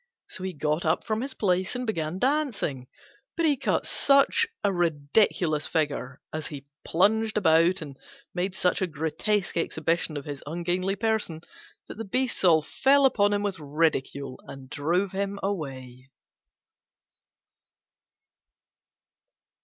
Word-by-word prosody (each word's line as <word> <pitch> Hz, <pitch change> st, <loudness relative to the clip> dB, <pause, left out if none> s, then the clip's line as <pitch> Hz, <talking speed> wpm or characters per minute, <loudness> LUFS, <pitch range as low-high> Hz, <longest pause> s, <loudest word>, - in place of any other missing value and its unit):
So -, -, -6 dB
he 190 Hz, -1 st, -3 dB
got 150 Hz, +1 st, -1 dB
up 160 Hz, +1 st, +1 dB
from 220 Hz, 0 st, -1 dB
his 265 Hz, +1 st, -4 dB
place 185 Hz, +1 st, 0 dB
and 250 Hz, 0 st, -3 dB
began 165 Hz, -6 st, -2 dB
dancing, 235 Hz, -, -1 dB, 0.5 s
but 335 Hz, -, +2 dB
he 295 Hz, -3 st, +4 dB
cut -, -, 0 dB
such 280 Hz, +11 st, +4 dB, 0.2 s
a 200 Hz, -, +2 dB
ridiculous 160 Hz, -1 st, +1 dB
figure 145 Hz, -4 st, -2 dB
as 155 Hz, -1 st, -3 dB
he 140 Hz, -3 st, -8 dB, 0.2 s
plunged 215 Hz, +5 st, +2 dB
about, 170 Hz, -1 st, +4 dB
and 140 Hz, -3 st, -11 dB, 0.3 s
made 185 Hz, +1 st, -2 dB
such 180 Hz, 0 st, +1 dB
a 185 Hz, -, +1 dB
grotesque 170 Hz, +7 st, -1 dB
exhibition 165 Hz, -1 st, 0 dB
of 140 Hz, -, -6 dB
his 145 Hz, -2 st, -6 dB
ungainly 175 Hz, +4 st, -1 dB
person, 215 Hz, -7 st, -1 dB, 0.5 s
that -, -, -9 dB
the -, -, -2 dB
beasts 250 Hz, +4 st, -1 dB
all 160 Hz, -4 st, +5 dB
fell 275 Hz, -, +3 dB
upon 205 Hz, -6 st, +3 dB
him 205 Hz, 0 st, 0 dB
with 195 Hz, -3 st, -2 dB
ridicule 140 Hz, -3 st, -1 dB
and 135 Hz, -1 st, -11 dB
drove 175 Hz, +7 st, 0 dB
him 200 Hz, +1 st, -2 dB
away. 135 Hz, -9 st, -5 dB
175 Hz, 135 wpm, -26 LUFS, 150-205 Hz, 0.5 s, all